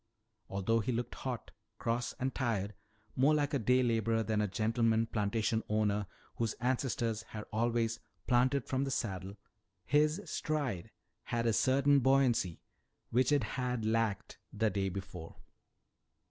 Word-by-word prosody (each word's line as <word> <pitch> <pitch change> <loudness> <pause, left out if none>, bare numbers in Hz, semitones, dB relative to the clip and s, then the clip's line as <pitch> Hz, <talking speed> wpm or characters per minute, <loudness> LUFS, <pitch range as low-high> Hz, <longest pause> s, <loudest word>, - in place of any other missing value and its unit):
Although 100 +4 +1
he 120 +3 -1
looked 120 0 -2
hot, 125 -3 -5 0.3
cross, 115 +1 -1
and 130 0 -2
tired, 110 -6 -1 0.4
more 140 +4 +4
like 145 -1 0
a 140 - +2
day 125 +3 +3
laborer 115 -1 +1
than 110 -1 0
a 105 - +1
gentleman 115 +2 +2
plantation 110 +1 0
owner 105 -2 +1 0.3
whose 115 -2 0
ancestors 120 -3 -1
had 110 -1 -8
always 115 0 +1 0.3
"planted 125 +2 +3
from 135 0 0
the 140 - -2
saddle," 100 -5 -3 0.5
his 150 +4 +3
stride 140 - -2 0.4
had 115 0 -1
a 115 - +3
certain 140 +4 +4
buoyancy 130 -10 +2 0.5
which 125 +4 +3
it 145 -4 +3
had 125 -1 -2
lacked 110 -3 0
the 110 -2 +1
day 95 0 0
before. 95 -3 -7
115 Hz, 140 wpm, -33 LUFS, 105-130 Hz, 0.5 s, more